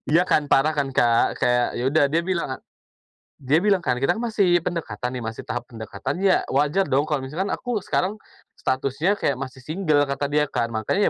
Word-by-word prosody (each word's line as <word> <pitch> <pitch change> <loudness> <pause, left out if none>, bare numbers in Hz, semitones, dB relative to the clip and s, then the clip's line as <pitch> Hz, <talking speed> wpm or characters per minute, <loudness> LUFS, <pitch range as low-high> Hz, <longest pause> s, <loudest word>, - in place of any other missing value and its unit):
Ya 175 - +6
kan? 150 -4 +2
Parah 150 +3 +3
kan, 135 -2 -1
Kak? 120 -2 +2
Kayak, 120 0 +3
ya 120 - -2
udah 155 0 +3
dia 165 +3 +1
bilang, 175 -2 -2
eee, - - -28 0.8
dia 140 +3 +2
bilang 195 +2 +3
kan, 125 - 0
"Kita 135 +2 +2
kan 225 - -5
masih 200 -7 +2
pendekatan 125 -10 -3
nih, 120 - -5
masih 110 0 -5
tahap 120 -1 -3
pendekatan, 115 - -6
ya 195 -2 +3
wajar 150 +8 +2
dong 140 0 +1
kalau 145 -3 -1
misalkan 175 +9 -3
aku 245 -4 -2
sekarang 185 +2 0 0.4
statusnya 140 +9 -1
kayak 140 - +1
masih 130 -1 -6
singgel," 155 -3 +1
kata 140 +1 -2
dia 150 0 +2
kan, 115 - 0
"mangkanya 115 - +1
145 Hz, 200 wpm, -23 LUFS, 130-180 Hz, 0.8 s, Ya